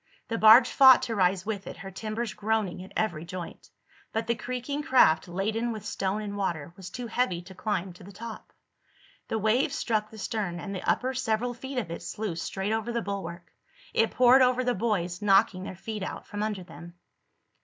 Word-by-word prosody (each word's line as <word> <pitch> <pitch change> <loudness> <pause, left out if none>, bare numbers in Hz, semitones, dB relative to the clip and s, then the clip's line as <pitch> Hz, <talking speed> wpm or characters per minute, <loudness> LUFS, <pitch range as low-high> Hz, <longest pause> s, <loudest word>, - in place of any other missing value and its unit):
The 230 - -1
barge 220 +4 +9
fought 265 -2 +8
to 230 - -2
rise 185 -1 +2
with 205 -3 -4
it, - - -7
her 195 +2 -8
timbers 215 +3 -4
groaning 210 -4 -1
at 190 - -13
every 175 -8 -1
joint. 175 0 -8 0.4
But 225 +1 -1
the 235 - +1
creaking 250 +5 -4
craft, 250 - +4
laden 215 +6 -1
with 215 -3 -7
stone 195 +2 -2
and 205 -1 -5
water, 170 -6 -3
was 185 -1 -9
too 245 +5 -6
heavy 230 -6 0
to 190 +2 -12
climb 190 -2 -2
to 180 - -15
the 195 - -11
top. 225 +3 -9 0.8
The 225 - -1
wave 220 +6 +2
struck 215 -6 -1
the 220 - -12
stern, 195 -5 -3
and 200 +3 -6
the 190 - -4
upper 260 +1 +1
several 245 -1 -1
feet 265 +2 -7
of 215 -9 -2
it 170 - -5
sluiced 205 -6 -4
straight 195 +2 -3
over 225 +1 -2
the 235 0 -2
bulwark. 180 -4 -6 0.4
It 225 - +3
poured 255 +1 +6
over 255 0 +3
the 245 0 +1
boys, 185 -5 -1
knocking 195 -2 +3
their 190 - -6
feet 215 +3 -6
out 190 - -5
from 205 - -5
under 210 -3 -2
them. 170 0 -12
215 Hz, 200 wpm, -28 LUFS, 185-230 Hz, 0.8 s, barge